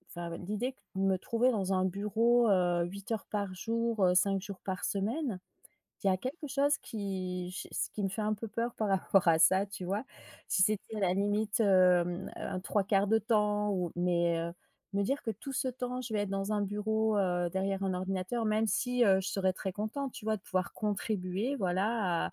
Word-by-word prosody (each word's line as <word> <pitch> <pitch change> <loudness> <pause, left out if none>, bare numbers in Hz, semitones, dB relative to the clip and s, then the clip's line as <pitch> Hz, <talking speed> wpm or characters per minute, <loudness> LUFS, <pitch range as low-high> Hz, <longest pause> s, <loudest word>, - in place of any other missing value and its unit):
bah, 170 0 -4
heu, - - -4
l'idée 210 +6 -2
que 230 - -34
de 190 - -1
me 195 -1 +3
trouver 235 +6 +1
dans 195 -4 0
un 185 0 +2
bureau, 220 +5 +2
heu, 175 -3 +3
8 195 +4 -8
heures 220 -2 -2
par 200 -3 -2
jour, 230 +1 -1
heu, 180 - +4
5 195 +1 +3
jours 200 -1 -8
par 185 -1 -4
semaine, 215 +2 -1 0.7
il - - +1
y - - +5
a 185 - +3
quelque 265 - -5
chose 285 +2 +2
qui 185 -4 -4
je 180 - -6
s - - -2
qui 210 - -4
me 195 - +1
fait 215 +3 -3
un 215 0 +1
peu 220 +2 -6
peur 230 +3 -2
par 215 - -1
rapport 195 -1 +3
à 160 -1 +5
ça 190 +4 +5
tu 200 -2 -7
vois? 200 +6 -2 0.4
Si 185 0 +3
c'était 215 +2 0
la 180 -2 +2
limite, 205 +2 0
hem, 180 -3 +4
heu, - - -12
un 185 -1 -3
3/4 195 +1 +1
de 220 +2 +4
temps 210 -2 +1
ou 180 -3 -1
mais, 170 -1 +2
heu, 170 +1 -3 0.4
me 200 - +2
dire 275 +8 -1
que 225 - -2
tout 225 +6 -7
ce 260 - 0
temps 250 0 -4
je 235 -3 -6
vais 210 - +1
être 205 - -3
dans 195 +1 -1
un 210 - +1
bureau, 215 +2 0
heu, 175 -2 +1
derrière 195 +1 -1
un 190 -1 0
ordinateur 185 +5 -2
même 215 +1 +2
si, 245 +2 +2
heu, 190 -3 +5
je 190 - -3
serais 190 -1 +1
très 190 0 -4
contente 235 +7 -3
tu 215 - -9
vois 220 0 +2
de - - -31
pouvoir 185 -1 -2
contribuer 210 +3 -1
voilà 190 -2 0
à - - -8
200 Hz, 225 wpm, -31 LUFS, 185-220 Hz, 0.7 s, y